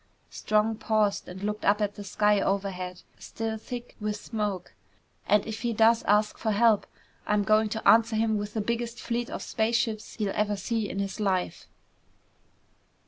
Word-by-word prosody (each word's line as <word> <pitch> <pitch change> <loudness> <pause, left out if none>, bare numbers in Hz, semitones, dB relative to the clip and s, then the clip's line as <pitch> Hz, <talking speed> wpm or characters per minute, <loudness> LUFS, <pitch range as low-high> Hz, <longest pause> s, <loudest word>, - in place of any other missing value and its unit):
Strong 215 +1 +1
paused 215 -2 0
and 185 +2 -8
looked 210 +1 -3
up 205 +1 +3
at 205 -1 0
the 205 - -8
sky 210 +1 +2
overhead, 185 -2 -2 0.2
still 225 -1 -4
thick 240 +2 -8
with 210 -1 -2
smoke. 205 -4 -4 0.5
"And 210 -1 +3
if 220 0 -5
he 235 -1 -1
does 225 +1 +4
ask 210 +1 +2
for 220 - -1
help, 220 0 +3 0.4
I'm 210 -1 +2
going 215 +1 +3
to 220 0 -3
answer 225 +2 +5
him 220 -1 +1
with 205 +1 -6
the 220 - 0
biggest 235 +2 -3
fleet 240 0 -2
of - - -5
spaceships 225 -1 -1
he'll 205 -3 -2
ever 210 0 0
see 220 0 -2
in - - -5
his 200 +1 -3
life!" 190 -3 -1
215 Hz, 170 wpm, -27 LUFS, 205-225 Hz, 0.5 s, answer